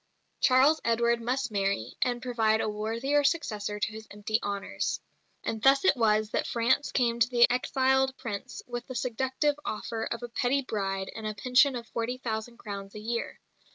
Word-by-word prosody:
Charles 270 Hz, +5 st, +5 dB
Edward 235 Hz, 0 st, +2 dB
must 250 Hz, +1 st, -1 dB
marry, 195 Hz, -, -1 dB
and 245 Hz, -1 st, 0 dB
provide 225 Hz, -3 st, +2 dB
a -, -, 0 dB
worthier 230 Hz, +7 st, 0 dB
successor 210 Hz, -9 st, -1 dB
to 210 Hz, -, -1 dB
his 220 Hz, 0 st, -9 dB
empty 210 Hz, +2 st, -1 dB
honours. 200 Hz, -1 st, -2 dB, 0.4 s
And 220 Hz, -, -3 dB
thus 275 Hz, -, +5 dB
it 375 Hz, -, +5 dB
was 215 Hz, -2 st, +2 dB
that -, -, 0 dB
France 240 Hz, +4 st, +1 dB
came 235 Hz, -2 st, +1 dB
to 230 Hz, +1 st, +4 dB
the 240 Hz, -1 st, +6 dB
exiled 265 Hz, +1 st, +2 dB
Prince 205 Hz, -5 st, -6 dB
with 240 Hz, 0 st, -6 dB
the 255 Hz, -, -7 dB
seductive 265 Hz, +4 st, 0 dB
offer 225 Hz, +1 st, -3 dB
of 235 Hz, +1 st, -4 dB
a -, -, -3 dB
pretty 255 Hz, +4 st, +1 dB
bride 195 Hz, -5 st, -2 dB
and 220 Hz, -1 st, -5 dB
a 215 Hz, -, -4 dB
pension 250 Hz, +6 st, +4 dB
of 235 Hz, -1 st, -5 dB
forty 235 Hz, +2 st, -2 dB
thousand 235 Hz, -1 st, -4 dB
crowns 200 Hz, -3 st, -7 dB
a -, -, -6 dB
year. 230 Hz, +2 st, -3 dB
235 Hz, 180 wpm, -28 LUFS, 215-255 Hz, 0.4 s, the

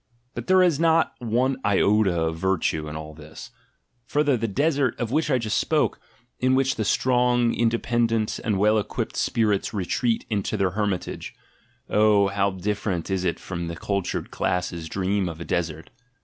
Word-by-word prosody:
But -, -, -6 dB
there 185 Hz, 0 st, +5 dB
is 170 Hz, -5 st, +2 dB
not 165 Hz, 0 st, +3 dB
one 125 Hz, +3 st, 0 dB
iota 100 Hz, -3 st, +3 dB
of 80 Hz, 0 st, -2 dB
"virtue" 80 Hz, -4 st, 0 dB
in 75 Hz, -, -7 dB
all 75 Hz, 0 st, -7 dB
this. 75 Hz, 0 st, -11 dB, 0.6 s
Further, 145 Hz, -2 st, +2 dB
the 115 Hz, -1 st, -1 dB
desert, 140 Hz, +2 st, 0 dB
of 120 Hz, -1 st, -2 dB
which 155 Hz, +2 st, +1 dB
I 130 Hz, -, +3 dB
just 110 Hz, -3 st, 0 dB
spoke, -, -, +1 dB, 0.4 s
in 130 Hz, +1 st, +3 dB
which 135 Hz, 0 st, +2 dB
the 110 Hz, -, -2 dB
strong, 125 Hz, +1 st, +2 dB
independent, 115 Hz, -1 st, 0 dB
and 110 Hz, -5 st, 0 dB
well 105 Hz, +2 st, +3 dB
equipped 105 Hz, -, -4 dB
spirits 105 Hz, -2 st, 0 dB
retreat 115 Hz, +5 st, 0 dB
into 105 Hz, -4 st, -2 dB
their 95 Hz, -2 st, +1 dB
hermitage 100 Hz, -1 st, -3 dB, 0.3 s
— -, -, -38 dB
oh, 105 Hz, -2 st, +4 dB
how 100 Hz, 0 st, +1 dB
different 95 Hz, -2 st, -3 dB
is 95 Hz, -1 st, 0 dB
it 90 Hz, -2 st, -1 dB
from 85 Hz, -2 st, -5 dB
the 85 Hz, -, -5 dB
cultured 100 Hz, +2 st, -3 dB
classes' 85 Hz, -2 st, -2 dB
dream 95 Hz, 0 st, -1 dB
of 80 Hz, -1 st, -8 dB
a 85 Hz, -, -6 dB
desert! 80 Hz, -2 st, -3 dB
105 Hz, 170 wpm, -24 LUFS, 90-120 Hz, 0.6 s, there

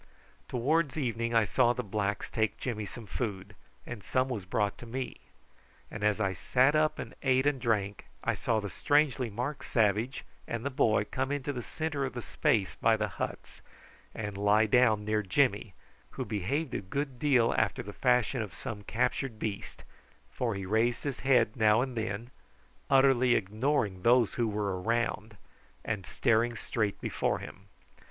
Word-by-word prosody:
Towards 145 Hz, +4 st, +1 dB
evening 115 Hz, -4 st, -1 dB
I 115 Hz, -1 st, +5 dB
saw 120 Hz, +2 st, +3 dB
the 125 Hz, -, -3 dB
blacks 100 Hz, -1 st, -2 dB
take 110 Hz, -1 st, -1 dB
Jimmy 110 Hz, -5 st, -3 dB
some 115 Hz, +3 st, -9 dB
food, 100 Hz, -4 st, -4 dB, 0.3 s
and 110 Hz, -5 st, -7 dB
some 130 Hz, +5 st, 0 dB
was 110 Hz, -7 st, -4 dB
brought 100 Hz, +2 st, 0 dB
to 120 Hz, -, -10 dB
me; 130 Hz, +2 st, -4 dB, 0.7 s
and 110 Hz, -, -6 dB
as 105 Hz, 0 st, +2 dB
I 95 Hz, -3 st, +1 dB
sat 130 Hz, +9 st, +2 dB
up 155 Hz, 0 st, +2 dB
and -, -, -6 dB
ate 130 Hz, -1 st, +2 dB
and 145 Hz, -3 st, +1 dB
drank 105 Hz, -4 st, -1 dB, 0.2 s
I -, -, +1 dB
saw 115 Hz, -2 st, 0 dB
the 105 Hz, -, -4 dB
strangely 145 Hz, -4 st, +2 dB
marked 125 Hz, +7 st, -4 dB
savage 110 Hz, +4 st, +1 dB, 0.2 s
and 115 Hz, +2 st, -4 dB
the 140 Hz, -, -1 dB
boy 110 Hz, -5 st, +2 dB
come 130 Hz, +4 st, -2 dB
into 145 Hz, 0 st, -2 dB
the 125 Hz, -, -4 dB
centre 150 Hz, +2 st, -3 dB
of 135 Hz, -, -3 dB
the 120 Hz, -, -4 dB
space 100 Hz, -5 st, +1 dB
by -, -, +3 dB
the -, -, 0 dB
huts, -, -, -6 dB, 0.5 s
and 105 Hz, -2 st, -4 dB
lie 105 Hz, +2 st, +4 dB
down 110 Hz, -2 st, +3 dB
near 110 Hz, 0 st, +1 dB
Jimmy, 105 Hz, -1 st, +1 dB, 0.3 s
who 130 Hz, -, -5 dB
behaved 115 Hz, -, -2 dB
a -, -, -2 dB
good 130 Hz, +6 st, -4 dB
deal 125 Hz, -5 st, +3 dB
after 110 Hz, -3 st, 0 dB
the 105 Hz, -, -8 dB
fashion 125 Hz, 0 st, +2 dB
of 105 Hz, -4 st, -6 dB
some 110 Hz, -6 st, -6 dB
captured 120 Hz, +2 st, -1 dB
beast, 105 Hz, -2 st, -5 dB, 0.5 s
for 115 Hz, -4 st, -2 dB
he 95 Hz, -1 st, -4 dB
raised 115 Hz, +4 st, +1 dB
his 140 Hz, -3 st, -3 dB
head 125 Hz, -5 st, +3 dB
now 110 Hz, -2 st, +4 dB
and 130 Hz, -1 st, -3 dB
then, 110 Hz, +2 st, -3 dB, 0.6 s
utterly 130 Hz, -2 st, +5 dB
ignoring 105 Hz, -1 st, 0 dB
those 120 Hz, +1 st, +4 dB
who 120 Hz, -2 st, 0 dB
were 100 Hz, -3 st, -2 dB
around, 110 Hz, 0 st, -1 dB, 0.5 s
and 105 Hz, -5 st, -3 dB
staring 120 Hz, -1 st, +2 dB
straight 110 Hz, -3 st, -2 dB
before -, -, 0 dB
him. 100 Hz, +1 st, -11 dB
115 Hz, 170 wpm, -30 LUFS, 105-130 Hz, 0.7 s, I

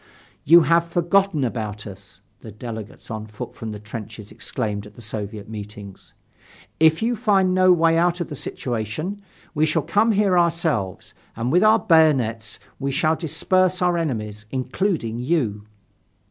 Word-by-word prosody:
"You 170 Hz, +4 st, +8 dB
have 170 Hz, +1 st, +3 dB
forgotten 175 Hz, -1 st, +2 dB
about 110 Hz, -4 st, -3 dB
us," 100 Hz, -2 st, -12 dB, 0.2 s
the 110 Hz, -, -10 dB
delegates 110 Hz, 0 st, -8 dB
on 110 Hz, 0 st, -5 dB
foot 105 Hz, -1 st, -8 dB
from 110 Hz, -1 st, -7 dB
the 105 Hz, -, -6 dB
trenches 105 Hz, -1 st, -9 dB
exclaimed 105 Hz, -4 st, -4 dB
at 105 Hz, -, -17 dB
the -, -, -12 dB
Soviet 105 Hz, -1 st, -6 dB
meetings. 105 Hz, -2 st, -10 dB, 0.6 s
"If 160 Hz, +5 st, +4 dB
you 240 Hz, +1 st, +1 dB
find 200 Hz, -5 st, +2 dB
no 185 Hz, 0 st, +5 dB
way 165 Hz, -1 st, +4 dB
out 175 Hz, +1 st, +2 dB
of 175 Hz, -, -3 dB
the 150 Hz, -, -7 dB
situation, 130 Hz, -, -4 dB, 0.3 s
we 155 Hz, -1 st, +2 dB
shall 155 Hz, 0 st, 0 dB
come 220 Hz, +7 st, +2 dB
here 195 Hz, -3 st, +3 dB
ourselves, 165 Hz, -, -1 dB, 0.2 s
and 115 Hz, +3 st, -2 dB
with 180 Hz, +5 st, +4 dB
our 215 Hz, +1 st, +6 dB
bayonets 135 Hz, -, +2 dB, 0.2 s
we 140 Hz, 0 st, -2 dB
shall 155 Hz, +4 st, +1 dB
disperse 185 Hz, +3 st, +1 dB
our 180 Hz, -2 st, +2 dB
enemies, 105 Hz, -10 st, -3 dB
including 130 Hz, -, -2 dB
you." 120 Hz, -8 st, -1 dB
140 Hz, 155 wpm, -22 LUFS, 110-175 Hz, 0.6 s, You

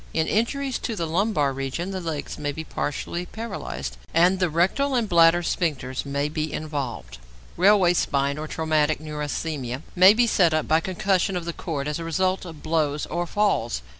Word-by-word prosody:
In 160 Hz, -1 st, +2 dB
injuries 260 Hz, -, 0 dB
to 230 Hz, -, -3 dB
the 170 Hz, -4 st, -2 dB
lumbar 160 Hz, -4 st, +1 dB
region 135 Hz, +8 st, -3 dB
the 190 Hz, -1 st, -4 dB
legs 160 Hz, -4 st, -4 dB
may 145 Hz, -1 st, -2 dB
be 160 Hz, +3 st, -6 dB
partly 170 Hz, +4 st, -4 dB
paralysed, 65 Hz, -, -6 dB, 0.2 s
and 180 Hz, +3 st, +4 dB
the 180 Hz, -2 st, +2 dB
rectal 190 Hz, -, +1 dB
and 235 Hz, -3 st, +1 dB
bladder 170 Hz, -1 st, +5 dB
sphincters 140 Hz, -7 st, -2 dB
may 140 Hz, +1 st, -1 dB
be 155 Hz, 0 st, -3 dB
involved. 130 Hz, -, -5 dB, 0.4 s
Railway 185 Hz, -1 st, +5 dB
spine, 140 Hz, -3 st, 0 dB
or 155 Hz, -, -4 dB
traumatic 155 Hz, -1 st, +1 dB
neurasthenia, 150 Hz, -3 st, -4 dB
may 190 Hz, +3 st, +8 dB
be 240 Hz, +1 st, +4 dB
set 175 Hz, -8 st, +3 dB
up 155 Hz, -, 0 dB
by 160 Hz, +1 st, +4 dB
concussion 185 Hz, +2 st, 0 dB
of 175 Hz, -, -5 dB
the 170 Hz, -, -3 dB
cord 145 Hz, -5 st, -4 dB
as 150 Hz, +2 st, -2 dB
a -, -, -4 dB
result 185 Hz, +4 st, 0 dB
of 160 Hz, -4 st, -10 dB
blows 155 Hz, -2 st, 0 dB
or 175 Hz, +2 st, -3 dB
falls. 160 Hz, -, 0 dB
160 Hz, 180 wpm, -24 LUFS, 145-185 Hz, 0.4 s, may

